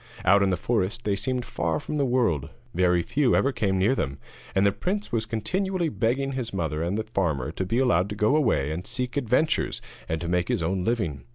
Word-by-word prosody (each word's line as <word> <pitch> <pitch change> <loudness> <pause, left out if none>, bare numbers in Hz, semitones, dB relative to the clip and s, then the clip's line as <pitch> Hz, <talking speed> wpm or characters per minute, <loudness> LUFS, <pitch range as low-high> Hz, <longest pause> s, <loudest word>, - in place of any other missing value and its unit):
Out 100 +2 +6
in 100 - +3
the 90 - +1
forest 110 +3 -1
they 100 -2 +1
seemed 125 +4 -1
far 80 -2 -1
from 150 - -4
the 140 -2 +2
world; 110 - +1 0.2
very 90 -1 +3
few 140 - +2
ever 140 - +3
came 100 -6 0
near 100 +7 +3
them, 70 - -2 0.4
and 95 +1 +4
the 100 - +5
prince 200 - -3
was 110 -1 -1
continually 180 - -1
begging 135 +2 0
his 125 -4 -3
mother 80 -5 -2
and 85 +5 -1
the 110 - -1
farmer 85 - -1
to 95 - -3
be 115 - 0
allowed 95 -8 +3
to 105 - -4
go 105 +6 +3
away 110 - +2
and 85 +4 -5
seek 125 0 -3
adventures 140 +4 +1 0.3
and 80 - -1
to 85 - -4
make 90 +1 +1
his - - 0
own 90 +2 0
living. 90 - -1
105 Hz, 220 wpm, -26 LUFS, 90-125 Hz, 0.4 s, Out